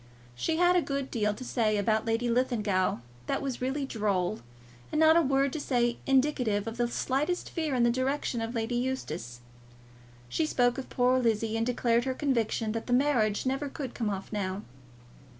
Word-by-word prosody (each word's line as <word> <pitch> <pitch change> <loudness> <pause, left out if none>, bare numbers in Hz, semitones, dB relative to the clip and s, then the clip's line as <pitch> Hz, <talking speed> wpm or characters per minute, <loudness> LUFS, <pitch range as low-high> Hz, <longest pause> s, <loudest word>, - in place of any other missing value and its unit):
She 320 - -1
had 355 +1 +4
a 355 - +4
good 275 -3 -3
deal 210 -3 0
to 255 - -8
say 220 -4 +1
about 215 +2 +1
Lady 230 +2 +1
Linlithgow 225 -6 +1 0.3
that - - 0
was 270 -3 -4
really 270 +2 -1
droll, 210 -5 -1 0.5
and 305 - 0
not 320 0 +6
a 335 - +6
word 275 -2 +1
to 310 - -2
say 240 -4 0
indicative 255 -7 +2
of 225 +1 -5
the 240 0 +1
slightest 280 +8 -1
fear 315 -5 -1
in 245 - +3
the 235 - +4
direction 260 -1 -1
of 225 +2 -4
Lady 225 +1 -1
Eustace. 180 - -3 0.9
She 310 - 0
spoke 245 -2 +2
of 265 - -7
poor 250 +1 +3
Lizzie, 225 -2 +1
and 225 +1 0
declared 240 -1 +1
her 260 -1 -1
conviction 230 -6 0
that 225 +1 -4
that 245 - 0
marriage 245 -6 +2
never 270 +2 -1
could 270 -3 -6
come 225 -3 -2
off 195 +1 -5
now. 195 0 -2
245 Hz, 185 wpm, -29 LUFS, 220-270 Hz, 0.9 s, not